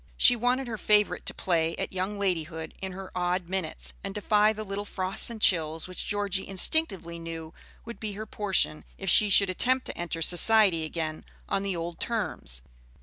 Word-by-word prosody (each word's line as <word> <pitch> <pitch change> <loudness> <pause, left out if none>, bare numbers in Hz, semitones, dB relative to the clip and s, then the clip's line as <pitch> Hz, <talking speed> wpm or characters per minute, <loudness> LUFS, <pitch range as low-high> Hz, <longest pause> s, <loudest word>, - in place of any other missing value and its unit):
She 245 - +6
wanted 250 +3 0
her 220 -2 -5
favorite 210 -1 +2
to - - +3
play 165 -2 0
at - - -4
young 190 +3 -3
ladyhood 165 -5 -2
in 190 -1 -4
her 190 0 -8
odd 180 0 -1
minutes, 185 -4 -4
and 195 0 -5
defy 210 +1 +3
the 215 0 -5
little 200 0 -4
frosts 190 +1 0
and 230 -2 -7
chills 165 -5 +1
which 185 - -6
Georgie 200 -2 -1
instinctively 190 - +2
knew 165 -1 -7 0.3
would 235 0 -8
be 215 -2 -4
her 215 +2 -6
portion 200 -7 0
if 195 -2 0
she 210 - +5
should 200 -1 +4
attempt 255 +7 0
to - - -6
enter 170 -1 -3
society 185 -2 +5
again 155 -1 -4 0.2
on - - 0
the 195 -2 -2
old 170 0 -5
terms. 65 - -1
190 Hz, 185 wpm, -27 LUFS, 170-210 Hz, 0.3 s, She